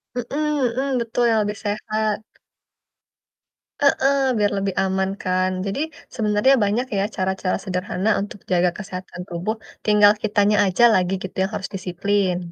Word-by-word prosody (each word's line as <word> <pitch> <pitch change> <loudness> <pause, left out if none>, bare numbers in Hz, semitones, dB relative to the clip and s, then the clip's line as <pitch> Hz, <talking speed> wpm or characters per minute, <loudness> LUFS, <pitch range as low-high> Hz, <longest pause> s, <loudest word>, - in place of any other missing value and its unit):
Mhm 245 -2 -2 0.5
mhm, 270 -1 0
betul, 235 +1 -1
yang 220 - +3
lebih 210 - -3
sehat 215 0 -1 1.6
Heeh, 280 -1 +3 0.2
biar 205 -1 +2
lebih 195 -1 -2
aman 190 0 0
kan. 185 0 +1
Jadi, 200 +8 -3 0.4
sebenernya 215 +3 +3
banyak 220 +6 +1
ya, 195 - +2
cara-cara 190 0 -1
sederhana 185 +1 -2
untuk 205 0 -7
jaga 180 0 +3
kesehatan 185 -3 -7
tubuh, 175 +6 -2 0.3
tinggal 210 -1 +6
kitanya 210 -1 +2
aja 190 +5 +2
lagi 185 0 +1
gitu, 190 - -7
yang 195 - -2
harus 195 -2 -4
disiplin. 185 0 0
200 Hz, 140 wpm, -22 LUFS, 185-215 Hz, 1.6 s, tinggal